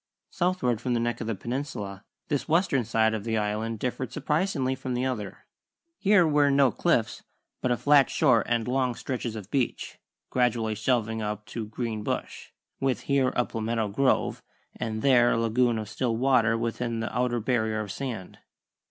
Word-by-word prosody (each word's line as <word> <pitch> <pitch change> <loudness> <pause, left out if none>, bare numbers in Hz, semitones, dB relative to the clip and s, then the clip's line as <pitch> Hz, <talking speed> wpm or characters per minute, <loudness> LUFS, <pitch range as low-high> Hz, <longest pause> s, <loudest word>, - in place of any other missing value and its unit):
Southward 170 -11 0
from 125 -2 0
the - - +1
neck 120 0 -1
of - - -4
the 115 - -1
peninsula 105 -5 -5 0.2
this 145 -2 -1
western 165 -6 +2
side 110 0 +2
of 110 -2 -3
the 110 0 -1
Island 110 +2 -1
differed 125 +2 -3
surprisingly 150 -3 0
from 130 -1 -4
the 125 +1 0
other. 110 -7 -4 0.5
Here 200 -3 +5
were 145 -2 +3
no 140 -2 +4
cliffs, - - 0 0.4
but 125 - 0
a 120 - +2
flat 145 0 +5
shore 125 -9 +3
and 120 -1 0
long 125 -1 0
stretches 120 -3 -4
of 105 -2 -8
beach, 130 -4 -2 0.3
gradually 120 -3 +1
shelving 110 0 0
up 105 0 -4
to 110 -3 -5
green 110 -1 -4
bush, - - -4 0.3
with 135 -5 0
here 135 -2 +2
a 120 - +2
palmetto 115 -1 -2
grove 130 +6 +1 0.3
and 110 -1 -4
there 120 -3 +5
a - - +1
lagoon 115 +1 +2
of 110 -1 -4
still 115 +1 -1
water 120 -3 +3
within 115 0 -2
the 115 - -4
outer 125 -1 +1
barrier 110 -2 0
of 105 -2 -4
sand. 115 -7 -6
120 Hz, 175 wpm, -27 LUFS, 110-130 Hz, 0.5 s, Here